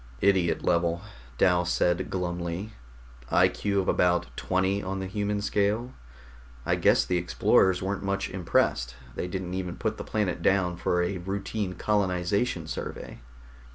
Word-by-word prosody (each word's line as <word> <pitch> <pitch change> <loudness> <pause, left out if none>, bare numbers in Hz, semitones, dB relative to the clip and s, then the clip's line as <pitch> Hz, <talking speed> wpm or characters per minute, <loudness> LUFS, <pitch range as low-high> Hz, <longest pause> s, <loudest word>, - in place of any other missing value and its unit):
"Idiot 95 -5 +2
level," 85 +1 +1 0.3
Dal 90 -2 +4
said 90 0 +1
glumly. 90 +2 -3 0.6
"I.Q. 100 -1 +2
of 95 - -5
about 90 0 +2
20 95 +2 0
on 95 0 -3
the 95 - -3
human 100 +1 -2
scale. 105 +5 0 0.7
I - - +2
guess - - +4
the 90 - +1
explorers 90 +2 +3
weren't 95 0 -2
much 100 0 -1
impressed; 80 -9 0 0.2
they - - -3
didn't 90 0 -4
even 90 -2 -3
put 110 -1 -2
the - - -5
planet 105 -6 -1
down 95 -2 +2
for 90 0 +1
a 90 +1 -2
routine 100 +1 -3
colonization 95 0 0
survey." 80 - -6
95 Hz, 140 wpm, -27 LUFS, 90-100 Hz, 0.7 s, Dal